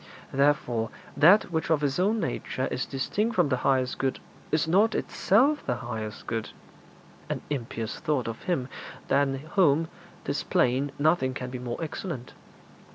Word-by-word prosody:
Therefore 130 -5 +2 0.3
that 175 +6 +6
which 160 -1 -1
of 155 -2 +2
its 140 +2 0
own 210 +5 +2
nature 130 -7 -2
is 125 - -2
distinct 210 - -1
from 175 -7 +3
the 130 - +1
highest 130 0 +1
good 135 -1 0 0.3
is 155 +1 +2
not 205 +6 +4
itself 275 +10 +2
the - - -1
highest 110 -3 -6
good 110 -2 -3 0.8
an - - -3
impious 115 -5 -3
thought 145 -6 0
of 115 -1 -5
Him 165 -9 0 0.4
than 140 -1 +3 0.2
whom, 165 -4 +4 0.4
'tis - - -1
plain, 130 +3 +1
nothing 145 -4 +2
can 125 -1 -5
be 125 - -5
more 120 -1 -4
excellent. 155 -5 -5
140 Hz, 155 wpm, -27 LUFS, 125-170 Hz, 0.8 s, that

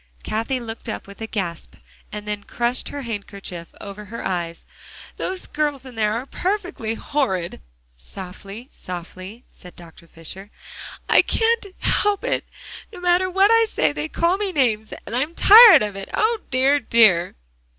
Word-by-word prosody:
Cathie 230 +4 -2
looked 225 -1 -8
up - - -5
with 200 +2 -14
a 225 - -4
gasp, 180 -7 -5 0.4
and 210 0 -7
then 210 -1 -3
crushed 240 +3 -2
her 285 -1 -6
handkerchief 200 -6 -6
over 205 +1 -9
her 230 +3 -7
eyes. 170 -2 -3 0.5
"Those 370 0 -3
girls 295 -3 -2
in 260 - -10
there 215 -2 0
are 235 +3 -3
perfectly 360 - -3
horrid." 225 - -2 0.4
"Softly, 195 - -10
softly," 185 +5 -9
said 180 - -15
Dr. 170 -1 -15
Fisher. 185 +5 -11 0.6
"I - - +6
can't 455 -2 +1
help 410 -1 +1
it. - - -1 0.5
No 380 - -10
matter 355 +1 +2
what 390 +3 +4
I 455 0 +5
say, 155 - +1
they 150 +1 -4
call 345 +3 +1
me 405 -1 -2
names, 225 -9 0
and 225 - -5
I'm 295 +7 -1
tired 435 - +9
of 205 -2 -4
it. 195 0 -8
O 450 +1 +1
dear, 270 +2 +3
dear!" 220 -8 +4
225 Hz, 160 wpm, -22 LUFS, 195-310 Hz, 0.6 s, tired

